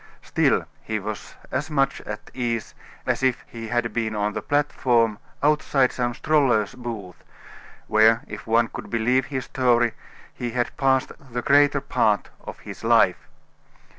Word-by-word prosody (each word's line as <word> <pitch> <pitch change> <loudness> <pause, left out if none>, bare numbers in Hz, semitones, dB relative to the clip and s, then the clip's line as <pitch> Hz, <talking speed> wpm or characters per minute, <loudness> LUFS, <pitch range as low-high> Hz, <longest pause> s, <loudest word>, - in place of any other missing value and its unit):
Still, - - +2 0.2
he 110 - -3
was 105 +1 -6 0.2
as 140 +4 -2
much 135 -3 +1
at 105 0 -7
ease 120 -3 -2 0.3
as - - 0
if 130 -2 +1
he 115 -1 -8
had 120 0 -1
been 110 -2 -1
on 105 0 0
the - - -3
platform 120 -6 +1 0.2
outside 145 -3 +3
some 120 -1 -2
stroller's 125 -9 +2
booth, 110 -8 -7 0.6
where, 110 +1 +4
if - - -9
one 115 +1 +3
could - - -8
believe 125 +3 +1
his 130 -3 -3
story, 120 -3 +2 0.4
he 120 - -4
had 120 -1 -1
passed 135 -1 +2
the 120 -3 -6
greater 145 0 +4
part 105 -7 +1
of - - -8
his - - -10
life. - - +3
120 Hz, 150 wpm, -24 LUFS, 110-130 Hz, 0.6 s, where